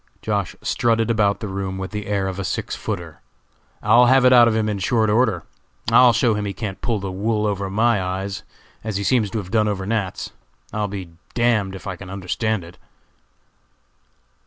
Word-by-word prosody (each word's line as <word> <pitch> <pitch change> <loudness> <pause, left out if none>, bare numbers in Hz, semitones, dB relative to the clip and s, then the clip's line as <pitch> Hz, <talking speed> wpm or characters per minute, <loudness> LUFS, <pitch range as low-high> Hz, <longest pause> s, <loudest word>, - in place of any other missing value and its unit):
Josh. - - -1
strutted 115 -1 +1
about 105 -2 +1
the 110 - -3
room 95 -1 -4
with 95 0 -5
the 105 -1 -5
air 100 -2 0
of 95 0 -4
a - - -2
six 90 - -3
footer. 85 -7 -5 0.6
"I'll 120 +1 +6
have 130 0 +5
it 125 - +7
out 120 -1 +8
of 115 - +1
him 110 -1 +1
in 105 -2 -2
short 110 +2 +2
order. 110 -7 +2 0.5
I'll 125 +1 +7
show 120 -1 +2
him 105 0 -2
he 100 - -3
can't 100 -4 -5
pull 115 -2 0
the 95 -1 -4
wool 105 +3 -1
over 100 -2 -1
my 110 +1 +2
eyes, 95 +2 -3 0.4
as 110 -3 -2
he 100 - -2
seems 115 -3 +2
to 110 - -4
have 95 -4 -5
done 110 -1 +3
over 100 -2 -2
Nat.'s. 100 -3 -2 0.4
I'll 105 -1 -1
be 95 -2 -5
d 85 - -19 0.2
d 120 - 0
if 100 -6 +1
I 95 -3 -4
can 95 0 -10
understand 100 +2 -2
it." 85 +1 -14
105 Hz, 205 wpm, -22 LUFS, 95-115 Hz, 0.6 s, out